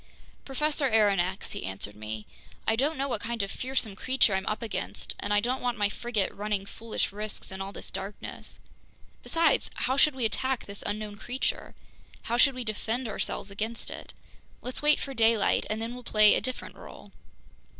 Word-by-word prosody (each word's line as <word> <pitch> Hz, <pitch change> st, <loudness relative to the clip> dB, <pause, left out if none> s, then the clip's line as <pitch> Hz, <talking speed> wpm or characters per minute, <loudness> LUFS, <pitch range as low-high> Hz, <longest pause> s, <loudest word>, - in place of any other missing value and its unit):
"Professor 290 Hz, +1 st, +1 dB
Aronnax," 195 Hz, -4 st, +3 dB
he -, -, -4 dB
answered 95 Hz, +2 st, -4 dB
me, 110 Hz, 0 st, -5 dB, 0.4 s
"I 225 Hz, -, +5 dB
don't 280 Hz, +6 st, +1 dB
know 275 Hz, +1 st, 0 dB
what 230 Hz, -6 st, -2 dB
kind 230 Hz, -1 st, -1 dB
of 195 Hz, -, -3 dB
fearsome 250 Hz, -5 st, -1 dB
creature 255 Hz, -1 st, +3 dB
I'm 190 Hz, 0 st, 0 dB
up 215 Hz, -, -1 dB
against, 225 Hz, -, -3 dB
and 205 Hz, -, -3 dB
I 205 Hz, -, +5 dB
don't 250 Hz, +5 st, 0 dB
want 245 Hz, -1 st, 0 dB
my 205 Hz, -1 st, +3 dB
frigate 220 Hz, -2 st, -1 dB
running 205 Hz, -1 st, -1 dB
foolish 225 Hz, +1 st, -2 dB
risks 210 Hz, 0 st, -4 dB
in 190 Hz, 0 st, -5 dB
all 195 Hz, +1 st, -4 dB
this -, -, -6 dB
darkness. 195 Hz, +2 st, -6 dB, 0.6 s
Besides, 330 Hz, -4 st, +3 dB
how 260 Hz, +2 st, 0 dB
should 290 Hz, 0 st, +5 dB
we 250 Hz, -3 st, +1 dB
attack 260 Hz, +5 st, 0 dB
this 200 Hz, 0 st, -7 dB
unknown 210 Hz, 0 st, -3 dB
creature, 250 Hz, +4 st, -2 dB, 0.5 s
how 235 Hz, -, 0 dB
should 275 Hz, +1 st, +6 dB
we 255 Hz, -, -3 dB
defend 230 Hz, +3 st, -1 dB
ourselves 200 Hz, -1 st, -2 dB
against 220 Hz, +3 st, -3 dB
it? -, -, -8 dB, 0.5 s
Let's 250 Hz, -, -3 dB
wait 300 Hz, 0 st, +5 dB
for 275 Hz, -, -4 dB
daylight, 225 Hz, -3 st, +4 dB
and 215 Hz, +1 st, -1 dB
then 230 Hz, +2 st, -3 dB
we'll 250 Hz, -, -7 dB
play 215 Hz, -3 st, +6 dB
a -, -, +3 dB
different 255 Hz, +4 st, -4 dB
role." -, -, -12 dB
225 Hz, 185 wpm, -29 LUFS, 205-255 Hz, 0.6 s, should